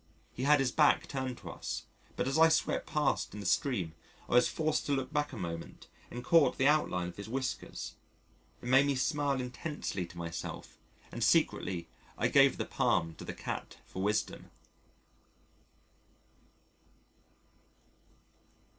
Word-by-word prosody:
He 130 Hz, -, -3 dB
had 150 Hz, 0 st, +6 dB
his 135 Hz, -2 st, +1 dB
back 150 Hz, +1 st, +4 dB
turned 130 Hz, -2 st, -3 dB
to -, -, -8 dB
us, -, -, -5 dB, 0.3 s
but 125 Hz, -, -1 dB
as 135 Hz, -, 0 dB
I 165 Hz, 0 st, +8 dB
swept 160 Hz, -, +1 dB
past 150 Hz, -8 st, 0 dB
in -, -, -6 dB
the 100 Hz, -, -7 dB
stream, 95 Hz, -, +1 dB, 0.3 s
I -, -, -4 dB
was 125 Hz, -, +6 dB
forced 155 Hz, -1 st, -1 dB
to 145 Hz, -, +1 dB
look 135 Hz, +1 st, -2 dB
back 145 Hz, -1 st, 0 dB
a 130 Hz, -, -7 dB
moment, 85 Hz, -3 st, -6 dB, 0.2 s
and 120 Hz, 0 st, -6 dB
caught 155 Hz, -4 st, +4 dB
the 135 Hz, -, +2 dB
outline 115 Hz, -12 st, +2 dB
of 85 Hz, -, -12 dB
his 100 Hz, +2 st, -7 dB
whiskers 130 Hz, +2 st, -4 dB, 0.7 s
it -, -, -8 dB
made 135 Hz, +3 st, +5 dB
me 140 Hz, -, +1 dB
smile 140 Hz, 0 st, +1 dB
intensely 125 Hz, -, -4 dB
to 85 Hz, -, -14 dB
myself 85 Hz, -1 st, -6 dB, 0.3 s
and -, -, -3 dB
secretly 90 Hz, -3 st, +2 dB, 0.3 s
I -, -, +1 dB
gave -, -, +5 dB
the -, -, -2 dB
palm 80 Hz, 0 st, +1 dB
to -, -, -8 dB
the -, -, -6 dB
cat -, -, -5 dB
for 95 Hz, -, -6 dB
wisdom. 105 Hz, +2 st, -1 dB
130 Hz, 155 wpm, -32 LUFS, 100-145 Hz, 0.7 s, I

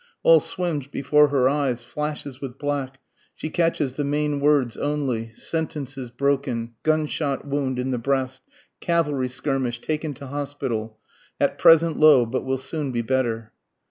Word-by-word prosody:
All -, -, +7 dB
swims 165 Hz, -7 st, -3 dB
before 150 Hz, +2 st, +3 dB
her 135 Hz, -3 st, +3 dB
eyes, 135 Hz, -4 st, 0 dB
flashes 145 Hz, +1 st, -5 dB
with 135 Hz, -2 st, -6 dB
black, 140 Hz, -2 st, -3 dB, 0.4 s
she 155 Hz, -, -5 dB
catches 165 Hz, -6 st, +1 dB
the 145 Hz, -, -2 dB
main 145 Hz, 0 st, 0 dB
words 140 Hz, -5 st, +2 dB
only, 135 Hz, -6 st, -2 dB
Sentences 145 Hz, -5 st, -4 dB
broken, 130 Hz, -2 st, -1 dB
_gunshot 155 Hz, -3 st, 0 dB
wound 140 Hz, -2 st, -1 dB
in 125 Hz, +1 st, -1 dB
the 125 Hz, -, -1 dB
breast, 130 Hz, 0 st, -1 dB, 0.4 s
cavalry 150 Hz, -7 st, 0 dB
skirmish, 130 Hz, -2 st, -2 dB
taken 155 Hz, +1 st, -3 dB
to 140 Hz, -, -9 dB
hospital, 135 Hz, -6 st, -4 dB, 0.4 s
At -, -, +1 dB
present 165 Hz, 0 st, +6 dB
low, 150 Hz, -6 st, +7 dB
but 130 Hz, +3 st, -2 dB
will 130 Hz, 0 st, -1 dB
soon 140 Hz, +1 st, -2 dB
be 120 Hz, -1 st, -1 dB
better. 115 Hz, -3 st, -1 dB
140 Hz, 145 wpm, -24 LUFS, 130-150 Hz, 0.4 s, All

